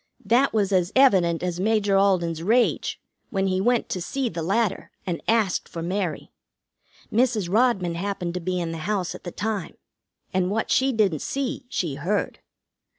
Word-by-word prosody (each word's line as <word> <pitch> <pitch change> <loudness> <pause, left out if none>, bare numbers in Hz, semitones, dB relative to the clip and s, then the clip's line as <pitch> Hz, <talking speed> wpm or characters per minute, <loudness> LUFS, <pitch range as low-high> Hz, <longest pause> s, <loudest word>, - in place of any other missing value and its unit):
That 240 +7 +3
was 205 -3 +1
as 180 -1 +2
evident 185 -11 +4
as 180 -1 -2
Major 205 0 +2
Alden's 180 -5 +2
rage 230 +7 +1 0.3
when 195 -2 0
he 185 0 +1
went 240 +3 +2
to 185 - -3
see 265 +7 -2
the 165 -3 -5
latter, 200 +4 0 0.2
and 175 -3 -3
asked 220 -5 +1
for 165 - -6
Mary. 180 -2 -3 0.8
Mrs. 220 -6 +1
Rodman 215 -7 +2
happened 180 -1 -3
to 180 - -2
be 180 +1 -2
in 170 -1 -2
the 165 - -5
house 195 -4 -1
at - - -11
the 175 - -4
time, 210 0 -3 0.6
and 185 -1 +1
what 220 +3 -1
she 265 +1 +3
didn't 200 - +1
see 270 -2 -3
she 170 - -2
heard. 200 +6 -1
195 Hz, 170 wpm, -24 LUFS, 175-225 Hz, 0.8 s, evident